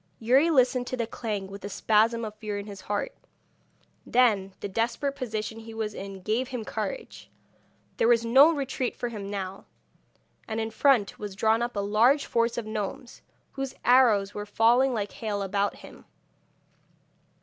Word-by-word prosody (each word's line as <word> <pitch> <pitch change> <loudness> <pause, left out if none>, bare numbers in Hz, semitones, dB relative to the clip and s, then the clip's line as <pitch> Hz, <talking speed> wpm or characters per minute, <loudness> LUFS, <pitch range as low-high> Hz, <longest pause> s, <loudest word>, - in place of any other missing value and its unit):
Youri 260 +8 +4
listened 255 -4 +3
to 255 - -3
the 235 - -1
clang 215 -3 -4
with 195 0 -10
a 200 - -5
spasm 225 +3 +2
of 215 - -6
fear 215 -1 -5
in 200 - -5
his 200 -2 -9
heart; 205 - -3 0.9
then 210 -6 +2
the - - -4
desperate 235 +7 -1
position 220 -4 -4
he 225 0 -10
was 215 -1 -3
in 195 -1 -8
gave 225 +6 0
him 245 -4 -5
courage. - - -5 0.7
There - - +3
was 235 -1 +4
no 270 +7 +7
retreat 275 -4 -2
for 245 - -3
him 205 -4 -6
now, 195 -1 -5 0.8
and 220 0 -3
in 225 0 -2
front 235 -3 +2
was 205 -2 -6
drawn 220 +3 +2
up 240 0 -2
a 200 - 0
large 230 +8 +3
force 230 0 0
of 235 - -3
gnomes, 215 +3 -5 0.3
whose 270 -1 -5
arrows 230 -6 +4
were 205 0 -6
falling 235 +5 +3
like 210 -4 -2
hail 205 -3 -3
about 200 +1 -1
him. - - -14
225 Hz, 170 wpm, -27 LUFS, 205-245 Hz, 0.9 s, no